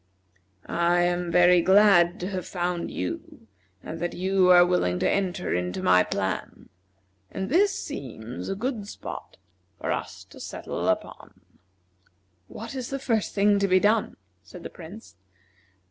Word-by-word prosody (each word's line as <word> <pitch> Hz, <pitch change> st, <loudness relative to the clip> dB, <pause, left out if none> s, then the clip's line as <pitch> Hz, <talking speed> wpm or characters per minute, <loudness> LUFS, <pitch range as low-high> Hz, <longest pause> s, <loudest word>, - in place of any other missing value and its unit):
I 170 Hz, +1 st, +1 dB
am 175 Hz, 0 st, 0 dB
very 175 Hz, 0 st, +5 dB
glad 190 Hz, -2 st, +5 dB
to 180 Hz, -, -3 dB
have 185 Hz, -2 st, -4 dB
found 175 Hz, -1 st, -2 dB
you 90 Hz, +4 st, -6 dB, 0.4 s
and 165 Hz, -, -7 dB
that 175 Hz, +1 st, -3 dB
you 185 Hz, 0 st, +2 dB
are 175 Hz, -1 st, +8 dB
willing 175 Hz, -, +1 dB
to -, -, +1 dB
enter 185 Hz, -2 st, -1 dB
into 90 Hz, 0 st, -2 dB
my 90 Hz, 0 st, +5 dB
plan; -, -, -4 dB, 0.6 s
and 190 Hz, 0 st, -4 dB
this 390 Hz, +7 st, +3 dB
seems 120 Hz, -2 st, -7 dB
a 195 Hz, -, -2 dB
good 220 Hz, -1 st, -3 dB
spot -, -, -8 dB, 0.4 s
for -, -, -2 dB
us -, -, -4 dB
to -, -, -13 dB
settle -, -, -5 dB
upon." -, -, -4 dB, 1.1 s
"What 225 Hz, +2 st, -8 dB
is 255 Hz, -3 st, -5 dB
the 275 Hz, -, -3 dB
first 230 Hz, -6 st, -1 dB
thing 205 Hz, 0 st, +3 dB
to 200 Hz, -, +2 dB
be 185 Hz, 0 st, +4 dB
done?" 210 Hz, +2 st, +1 dB, 0.2 s
said 175 Hz, -, -13 dB
the -, -, -7 dB
Prince. 170 Hz, -, -12 dB
180 Hz, 150 wpm, -26 LUFS, 170-205 Hz, 1.1 s, are